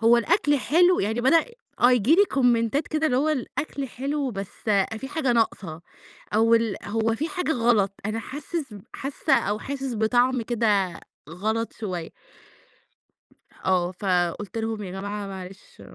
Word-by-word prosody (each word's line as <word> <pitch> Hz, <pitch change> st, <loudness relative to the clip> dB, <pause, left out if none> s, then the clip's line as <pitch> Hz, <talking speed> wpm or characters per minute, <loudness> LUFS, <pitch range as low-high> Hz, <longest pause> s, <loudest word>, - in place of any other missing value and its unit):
هو 230 Hz, +1 st, +6 dB
الأكل 290 Hz, -, +2 dB
حلو 350 Hz, +6 st, +4 dB
يعني 220 Hz, +4 st, -1 dB
بدأ، 320 Hz, +7 st, +4 dB, 0.4 s
آه 245 Hz, -, +6 dB
ييجي 250 Hz, +5 st, +4 dB
لي 405 Hz, +3 st, +6 dB
كومنتات 245 Hz, -, +1 dB
كده 310 Hz, 0 st, 0 dB
اللي 250 Hz, -3 st, +1 dB
هو 295 Hz, +4 st, +2 dB
الأكل 280 Hz, -1 st, -3 dB
حلو 275 Hz, +2 st, -2 dB
بس 195 Hz, -2 st, -5 dB, 0.5 s
في 270 Hz, -, -7 dB
حاجة 280 Hz, -4 st, 0 dB
ناقصة، 195 Hz, -8 st, -1 dB, 0.5 s
أو 225 Hz, +1 st, +5 dB
ال 230 Hz, -3 st, +1 dB
هو 225 Hz, +2 st, 0 dB
في 310 Hz, +8 st, -2 dB
حاجة 360 Hz, -4 st, -1 dB
غلط، 230 Hz, -6 st, +2 dB
أنا 220 Hz, +1 st, -2 dB
حاسس 290 Hz, -2 st, -5 dB
ب 200 Hz, -, -10 dB
حاسّة 275 Hz, +1 st, 0 dB
أو 205 Hz, +1 st, +1 dB
حاسس 270 Hz, 0 st, -4 dB
بطعم 240 Hz, +3 st, +2 dB
كده 210 Hz, -6 st, 0 dB, 0.3 s
غلط 220 Hz, +6 st, -2 dB
شوية. 180 Hz, -7 st, -5 dB, 1.6 s
آه، 180 Hz, -1 st, +2 dB
فقُلت 185 Hz, +2 st, -1 dB
لهم 225 Hz, -1 st, -3 dB
يا 185 Hz, -, -6 dB
جماعة 200 Hz, +2 st, -5 dB
معلش 190 Hz, 0 st, -10 dB
230 Hz, 150 wpm, -25 LUFS, 205-270 Hz, 1.6 s, هو